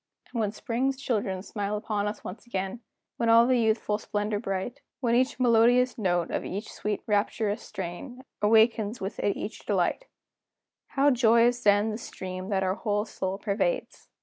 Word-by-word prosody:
And 235 - -2
when 210 -2 0
spring's 255 +5 -1
children 205 -8 -1
smile 205 0 -3
upon 210 -1 -2
us 210 0 -5
once 215 +6 -8
again, 195 0 -3 0.4
When 230 -1 +1
all 230 +1 +7
the 255 0 +3
youthful 220 -2 +1
splendor 210 0 -2
bright, 205 +6 -4 0.2
When 235 -3 +1
each 255 +3 +2
melodious 245 +1 +4
note 175 -5 0
of - - -1
each 205 +4 -5
sweet 210 -1 -3
rapturous 210 0 0
strain 195 +9 -7 0.2
Awakens 220 +1 +3
with 195 +1 -5
it 205 - 0
each 215 - -6
delight: - - 0 0.8
How 280 +1 +3
joyous 235 0 +4
then 205 +1 +4
the 215 - -5
stream 185 -2 -6
that 190 -2 +1
our 185 0 +1
whole 210 0 -1
soul 190 -3 -3
pervades! 220 - -2
215 Hz, 165 wpm, -27 LUFS, 200-240 Hz, 0.8 s, all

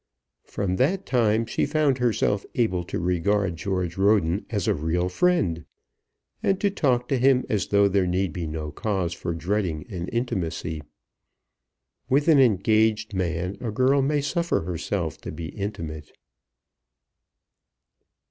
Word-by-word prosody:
From 95 -2 -2
that 180 +9 +1
time 115 -3 +2
she 115 - -1
found 150 -4 +1
herself 110 -4 +1
able 95 -7 +1
to - - -4
regard 90 +2 0
George 90 0 -3
Roden 100 -2 +2
as 105 -3 -2
a 105 - +4
real 85 +2 -1
friend, 90 - +1 0.8
and 195 -1 +1
to 200 - +1
talk 125 -9 +1
to 135 - +1
him 130 0 +4
as 105 -3 0
though 100 0 +4
there 95 -1 +1
need 90 -1 0
be 85 -2 -4
no 75 -1 -5
cause 95 0 -2
for 85 0 -4
dreading 85 -3 -2
an 85 -1 -4
intimacy. 85 -9 -3 1.3
With 140 +3 +2
an 150 -3 +6
engaged 110 -1 +3
man 90 0 -2
a 120 - -2
girl 130 +5 +3
may 145 +2 +1
suffer 170 +4 0
herself 85 -1 -3
to - - -6
be 80 +1 -6
intimate. 85 -8 -6
100 Hz, 140 wpm, -25 LUFS, 85-125 Hz, 1.3 s, an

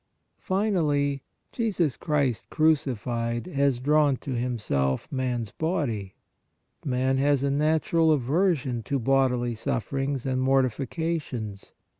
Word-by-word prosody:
4. 190 - -2
Finally, 145 -9 +1 0.3
Jesus 190 - 0
Christ 140 -7 -1
crucified 120 -7 0
has 140 -6 +1
drawn 145 0 +3
to 135 - -7
EPILOGUE 120 -2 -1
209 125 - -1
Himself 70 - -1
MAN 130 -3 -1
S 110 - -7
BODY. 135 - -2 0.7
Man 130 0 +1
has 140 -1 +2
a 140 - +1
natural 160 +2 +2
aversion 145 -3 +1
to 140 +6 -2
bodily 125 -1 +1
sufferings 135 +4 -2
and 130 -1 0
mortifications. 130 - -1
135 Hz, 120 wpm, -26 LUFS, 120-150 Hz, 0.7 s, drawn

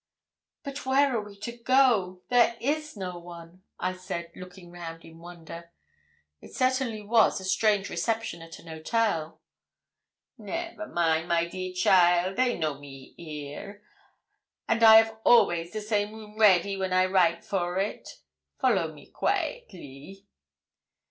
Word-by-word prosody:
'But 280 +1 -6
where 265 0 +2
are 225 - 0
we 205 -1 -12
to 235 - -4
go? 230 -8 +2
There 240 -1 +3
is 300 0 -2
no 180 -2 -5
one!' 170 +1 -12 0.2
I 185 +1 -1
said, 185 -2 -6
looking 180 -1 -12
round 165 -1 -9
in 165 0 -14
wonder. 170 0 -11 0.7
It - - -13
certainly 255 -4 0
was 220 0 +3
a 190 - -8
strange 205 0 +2
reception 220 -1 -3
at 165 0 -11
an - - -16
hotel. 165 +1 -2 1.0
'Never 320 - -5
mind, 165 -1 0
my 170 -1 +2
dear 185 +1 -6
cheaile. 180 0 +3
They 250 -1 +1
know 155 -3 -2
me 135 -2 -13
here, 160 +6 -9 0.8
and 225 +1 +1
I 220 -1 +9
have 220 0 +4
always 175 -8 +4
the 215 - -5
same 210 0 -1
room 215 -1 -12
ready 195 -2 +4
when 190 -1 -2
I 185 0 +4
write 180 -3 +2
for 180 -2 -2
it. 195 +2 -4 0.4
Follow - - +1
me - - -15
quaitely.' 190 - -4
190 Hz, 140 wpm, -27 LUFS, 170-225 Hz, 1.0 s, I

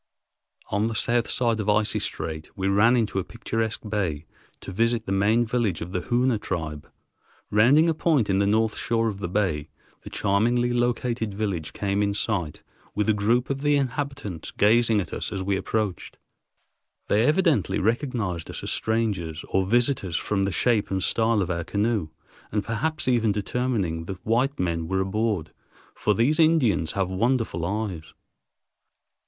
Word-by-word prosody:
On 105 +2 +1
the 115 - -3
south 120 +2 +1
side 115 -3 +1
of 105 0 -1
Icy 105 0 +2
Strait 80 -1 -5
we 95 0 -1
ran 105 +5 +4
into 110 -4 0
a - - -2
picturesque 115 0 -3
bay 90 -8 -2 0.4
to - - -7
visit 115 +3 +1
the - - -4
main 105 +5 +3
village 115 -8 0
of 85 +2 -6
the 90 -2 -2
Hoona 120 +2 +1
tribe. 75 -3 -5 0.6
Rounding 130 +10 +5
a 165 - +3
point 155 -8 +2
on 95 -1 +2
the 100 - +2
north 110 +1 +2
shore 115 -1 0
of 100 -2 -6
the 90 -3 -3
bay, 85 -7 -1 0.3
the - - -9
charmingly 120 +5 +1
located 120 -3 -1
village 100 -7 -2
came 100 0 -1
in 100 -1 0
sight, 95 -8 -2 0.3
with 105 +1 0
a - - +5
group 115 +5 +1
of 135 0 -3
the 145 0 +3
inhabitants 135 - -3
gazing 110 +1 +3
at 90 -5 -4
us - - -4
as 95 -1 -3
we 100 +1 0
approached. 105 -1 -3 0.9
They 105 +2 +3
evidently 155 +2 +2
recognized 110 - -1
us - - -6
as - - -2
strangers 100 -9 -1
or 95 -1 +1
visitors 120 - +1
from 100 -2 0
the 100 - -1
shape 110 +3 +1
and 95 -1 -1
style 110 -2 +2
of 90 - -3
our 85 -1 -2
canoe, 105 -3 -1 0.4
and 105 -1 0
perhaps 155 +10 -2
even 115 -4 +3
determining 100 -5 -1
that 95 0 -8
white 125 +6 +1
men 85 -2 -1
were 95 +2 0
aboard, 95 -4 -1 0.4
for 105 - 0
these 135 +10 +2
Indians 125 - +3
have 95 -2 0
wonderful 110 -2 0
eyes. 100 -4 -4
105 Hz, 170 wpm, -25 LUFS, 95-120 Hz, 0.9 s, Rounding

